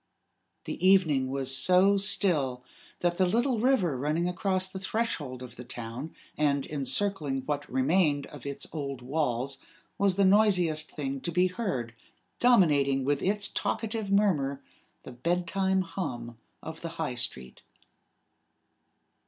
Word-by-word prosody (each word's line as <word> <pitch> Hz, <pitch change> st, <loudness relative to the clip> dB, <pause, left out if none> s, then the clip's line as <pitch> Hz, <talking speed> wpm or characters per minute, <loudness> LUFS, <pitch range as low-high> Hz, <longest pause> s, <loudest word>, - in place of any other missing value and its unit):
The -, -, -6 dB
evening 160 Hz, -9 st, +4 dB
was 135 Hz, 0 st, -1 dB
so 185 Hz, +8 st, +5 dB
still 160 Hz, -11 st, +1 dB, 0.4 s
that 175 Hz, 0 st, +1 dB
the 185 Hz, -, +4 dB
little 235 Hz, +5 st, +1 dB
river 215 Hz, -, +2 dB
running 150 Hz, +6 st, 0 dB
across 185 Hz, +1 st, 0 dB
the 190 Hz, 0 st, -7 dB
threshold 165 Hz, -, -3 dB
of 125 Hz, -1 st, -11 dB
the 125 Hz, -, -7 dB
town, 120 Hz, +5 st, -7 dB, 0.2 s
and 140 Hz, -2 st, +2 dB
encircling 150 Hz, -1 st, 0 dB
what 145 Hz, -1 st, -3 dB
remained 145 Hz, +2 st, +2 dB
of 145 Hz, -4 st, -12 dB
its 140 Hz, -1 st, -4 dB
old 140 Hz, -5 st, -5 dB
walls, 135 Hz, -1 st, -2 dB, 0.4 s
was 200 Hz, -2 st, +3 dB
the 200 Hz, 0 st, +3 dB
noisiest 180 Hz, -6 st, +3 dB
thing 135 Hz, -2 st, -4 dB
to 170 Hz, -, -3 dB
be 180 Hz, +2 st, +3 dB
heard, 180 Hz, -, -3 dB, 0.5 s
dominating 145 Hz, -, +4 dB
with 145 Hz, 0 st, +1 dB
its 205 Hz, +1 st, 0 dB
talkative 220 Hz, -2 st, -2 dB
murmur 150 Hz, -10 st, +1 dB, 0.4 s
the -, -, -9 dB
bedtime 180 Hz, +7 st, 0 dB
hum 120 Hz, -, -5 dB, 0.2 s
of 160 Hz, 0 st, -8 dB
the 165 Hz, -, -4 dB
High 155 Hz, -6 st, -2 dB
Street. 65 Hz, -, -5 dB
155 Hz, 135 wpm, -28 LUFS, 135-190 Hz, 0.5 s, so